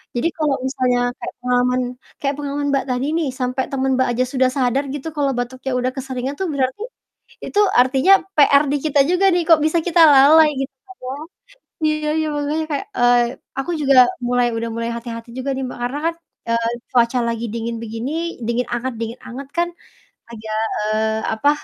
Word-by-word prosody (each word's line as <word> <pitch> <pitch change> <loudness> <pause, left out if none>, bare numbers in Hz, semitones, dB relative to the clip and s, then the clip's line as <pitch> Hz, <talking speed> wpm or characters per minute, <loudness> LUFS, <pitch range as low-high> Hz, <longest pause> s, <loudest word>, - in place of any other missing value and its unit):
jadi 240 +7 +1
kalau 300 -3 +1
misalnya 250 -2 +1 0.2
kayak - - -6
pengalaman 250 0 +1 0.4
kayak 280 0 -1
pengalaman 285 0 -3
Mbak 275 - +1
tadi 250 +2 -1
nih, 320 -4 0
sampai 255 +1 -1
temen 265 -1 0
Mbak 260 - +2
aja 245 +2 +1
sudah 260 -1 +3
sadar 265 +2 +1
gitu 290 +2 -6
kalau 280 -2 +1
batuknya 260 +2 -4
udah 255 +1 0
keseringan 265 +1 -4
tuh 380 - -1
berarti 260 +7 -1 0.6
itu 410 - -3 0.2
artinya 265 +8 +4 0.2
PR 285 -1 +6
di 290 - +2
kita 295 -2 +2
juga 360 +2 +2
nih, 350 - +2
kok 320 -2 +6
bisa 315 +2 +2
kita 350 -1 +3
lalai, 305 +3 +7
gitu 270 0 -4
kan 380 0 -14
ya? - - -4 0.8
Iya 305 0 0
iya, 315 - 0
makanya 295 +2 -1
kayak, 290 +8 -2
eee, 245 0 +5 0.4
aku 310 +6 -3
juga 275 -1 +3 0.3
mulai 245 0 +2
udah 230 0 -3
mulai 230 0 -2
hati-hati 230 0 -8
juga 265 +2 -3
nih 265 - -3
Mbak, - - -8
karena 265 +4 -2
kan, 330 0 0 0.3
eee, 230 0 +1 0.2
cuaca 245 0 +2
lagi 230 0 -2
dingin 230 0 -3
begini, 230 +4 -5 0.3
dingin 235 +2 -1
anget 245 +1 -2
dingin 230 +1 -5
anget 265 +3 -8
kan 345 0 +2 0.6
agak, 215 -1 -5 0.2
eee, 220 +1 0
apa, 255 +7 +2
260 Hz, 185 wpm, -20 LUFS, 245-290 Hz, 0.8 s, lalai